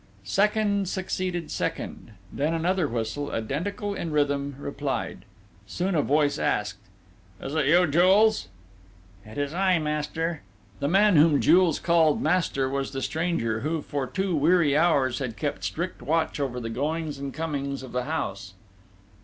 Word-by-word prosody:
Second 200 Hz, -, +1 dB
succeeded 185 Hz, -3 st, -3 dB
second; -, -, -4 dB, 0.2 s
then 150 Hz, +4 st, 0 dB
another 175 Hz, 0 st, +1 dB
whistle, 120 Hz, +4 st, -3 dB
identical 180 Hz, -, -3 dB
in 170 Hz, -, -4 dB
rhythm, 145 Hz, -2 st, 0 dB
replied: 140 Hz, 0 st, -4 dB, 0.4 s
soon 185 Hz, -, -2 dB
a 155 Hz, -, +3 dB
voice 145 Hz, +1 st, +1 dB
asked: 105 Hz, -2 st, -1 dB, 0.6 s
"It's 135 Hz, -, -6 dB
you, 160 Hz, +4 st, +4 dB
Jules?" 185 Hz, -, +4 dB, 0.8 s
"It 110 Hz, +4 st, -12 dB
is 145 Hz, +1 st, -2 dB
I, 185 Hz, 0 st, +3 dB
master!" 155 Hz, +1 st, -2 dB, 0.4 s
The 140 Hz, -, 0 dB
man 195 Hz, +2 st, +4 dB
whom 150 Hz, -1 st, +5 dB
Jules 180 Hz, -3 st, +4 dB
named 165 Hz, -3 st, +4 dB
"master," 155 Hz, -5 st, +1 dB
was 135 Hz, +1 st, -3 dB
the 135 Hz, -, -3 dB
stranger, 155 Hz, -9 st, -1 dB
who, 155 Hz, +4 st, -2 dB
for 140 Hz, -2 st, -3 dB
two 190 Hz, +4 st, -1 dB
weary 155 Hz, -1 st, +3 dB
hours, 145 Hz, -6 st, +2 dB
had 125 Hz, -6 st, -4 dB
kept -, -, -3 dB
strict -, -, -3 dB
watch 160 Hz, +2 st, 0 dB
over 130 Hz, -3 st, -2 dB
the 115 Hz, -1 st, -5 dB
goings 150 Hz, +3 st, -2 dB
and 140 Hz, 0 st, -4 dB
comings 140 Hz, -3 st, -3 dB
of 130 Hz, -, -9 dB
the 125 Hz, 0 st, -2 dB
house.... 100 Hz, -, -4 dB
150 Hz, 145 wpm, -26 LUFS, 140-175 Hz, 0.8 s, whom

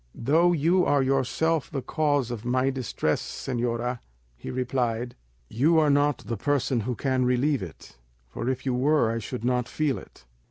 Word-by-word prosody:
"Though 160 Hz, +8 st, +3 dB
you 175 Hz, +3 st, +3 dB
are 145 Hz, -4 st, +3 dB
yourself 135 Hz, +4 st, 0 dB
the 135 Hz, -4 st, -4 dB
cause 145 Hz, -3 st, 0 dB
of 115 Hz, -3 st, -5 dB
my 130 Hz, +2 st, +1 dB
distress, 120 Hz, -, -1 dB
señora," 120 Hz, -1 st, -3 dB, 0.4 s
he -, -, -9 dB
replied, 125 Hz, -2 st, -2 dB, 0.3 s
"you 150 Hz, -, +2 dB
are 155 Hz, -2 st, +4 dB
not 145 Hz, -1 st, +2 dB
the 115 Hz, -, -3 dB
person 135 Hz, 0 st, 0 dB
who 120 Hz, +3 st, -2 dB
can 130 Hz, -1 st, 0 dB
relieve 125 Hz, +3 st, +1 dB
it, 85 Hz, -8 st, -10 dB, 0.3 s
for 115 Hz, -, -4 dB
if 130 Hz, 0 st, -3 dB
you 130 Hz, -, 0 dB
were 130 Hz, -2 st, +2 dB
I 115 Hz, -, -2 dB
should 120 Hz, +2 st, -5 dB
not 125 Hz, -1 st, +1 dB
feel 150 Hz, -4 st, 0 dB
it." -, -, -17 dB
130 Hz, 170 wpm, -26 LUFS, 120-145 Hz, 0.4 s, are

